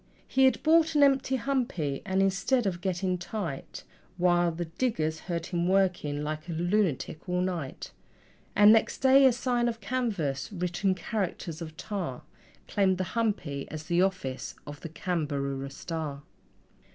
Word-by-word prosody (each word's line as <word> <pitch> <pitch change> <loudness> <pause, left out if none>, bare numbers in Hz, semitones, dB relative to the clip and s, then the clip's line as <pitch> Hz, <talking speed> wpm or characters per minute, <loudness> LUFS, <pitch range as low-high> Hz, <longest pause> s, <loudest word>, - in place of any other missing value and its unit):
He 265 0 +4
had 260 - +2
bought 320 0 +4
an 290 - +6
empty 270 -1 +3
humpy, 230 - -1
and, 190 0 +2
instead 195 +6 +1
of 175 -3 -1
getting 185 -1 -1
tight, 175 -6 -5 0.3
Why, 175 -1 +3
the 170 +1 -3
diggers 160 -4 -1
heard 170 -2 -3
him 175 -1 -1
working 180 -6 +1
like 155 +2 -4
a - - -2
lunatic 175 -2 0
all 180 0 +1
night: 175 -7 -3 0.6
And 210 +1 +8
next 225 - +2
day 270 +1 +6
a - - +5
sign 245 0 0
of 230 -1 -2
canvas, 200 - -2
writ 180 -1 -3
in 190 -1 +3
characters 180 -4 -3
of 160 -1 -7
tar, 180 - -4 0.4
Claimed 190 -2 +2
the 185 - 0
humpy 200 -12 -1
as 155 0 -6
the 170 +3 +1
office 180 -9 -2
of 145 -1 -8
the 165 - -6
CAMBAROORA 140 -5 -2
STAR. 150 -1 -5
180 Hz, 155 wpm, -28 LUFS, 160-215 Hz, 0.6 s, And